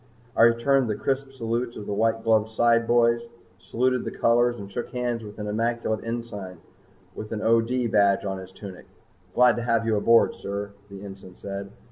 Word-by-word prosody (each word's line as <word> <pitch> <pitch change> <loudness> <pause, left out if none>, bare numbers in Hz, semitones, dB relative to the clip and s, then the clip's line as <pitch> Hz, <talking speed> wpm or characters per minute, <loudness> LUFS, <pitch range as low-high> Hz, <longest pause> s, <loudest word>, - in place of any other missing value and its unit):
I - - +3
returned 115 +2 +4
the 105 - 0
crisp 135 +2 -2
salutes 120 -1 -3
of 105 - -7
the 100 - -3
white 115 +2 +1
gloved 110 -1 +2
sideboys, 115 +1 +2 0.3
saluted 125 +5 0
the - - -3
colors, 120 +1 +2
and 100 -2 -9
shook 120 +4 -4
hands 120 -2 -2
with 105 -1 -10
an 105 - -5
immaculate 115 +1 -1
ensign 115 -6 -6 0.6
with 110 - -8
an 110 -1 -3
O.D. 115 +2 +2
badge 100 -3 +3
on 95 -1 -3
his 95 0 -11
tunic. 95 -1 -11 0.5
"Glad 125 0 +5
to - - -2
have 115 -1 +1
you 110 -1 +1
aboard, 115 +3 +4
sir," 100 +1 -5 0.2
the 100 0 -10
ensign 95 -2 -11
said. 100 0 -6
115 Hz, 180 wpm, -25 LUFS, 100-120 Hz, 0.6 s, Glad